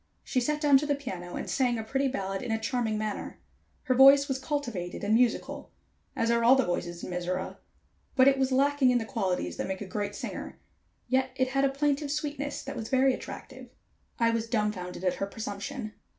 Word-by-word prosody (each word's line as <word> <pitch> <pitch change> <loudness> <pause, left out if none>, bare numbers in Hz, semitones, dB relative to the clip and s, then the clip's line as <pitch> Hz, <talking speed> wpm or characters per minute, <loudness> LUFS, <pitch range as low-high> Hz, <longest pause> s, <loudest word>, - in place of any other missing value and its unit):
She 255 - 0
sat 300 +4 0
down 290 -3 +5
to 295 - -3
the 290 - +2
piano 185 -11 -6
and - - -4
sang 250 -3 +1
a 220 - -3
pretty 270 +5 0
ballad 195 -6 -3
in 235 - -4
a 225 - +2
charming 225 -1 -1
manner. 215 -1 -4 0.4
Her 255 - +2
voice 275 +2 +7
was 270 -2 -2
cultivated 240 - -3
and 205 +1 +1
musical, 240 0 +1 0.5
as 230 -3 +1
are 235 0 +2
all 245 +3 +7
the 265 - +2
voices 175 -1 -3
in - - -5
Mizora, 180 +1 -3 0.6
but 260 0 +6
it 270 -1 +4
was 265 0 +1
lacking 275 0 +3
in 250 - +4
the 225 - -2
qualities 185 - -2
that - - -2
make 190 0 -3
a 205 - -5
great 205 +1 -3
singer, - - -6 0.5
yet 260 +1 +2
it 260 -1 +1
had 275 +1 +2
a - - +3
plaintive 285 +1 0
sweetness 290 -1 -3
that 275 +1 -6
was 225 -1 -5
very 265 0 +4
attractive. - - -8 0.5
I 230 -1 +3
was 230 0 -1
dumbfounded 210 -6 -2
at 180 - +2
her 195 - -2
presumption. 215 +3 -5
245 Hz, 210 wpm, -28 LUFS, 205-275 Hz, 0.6 s, voice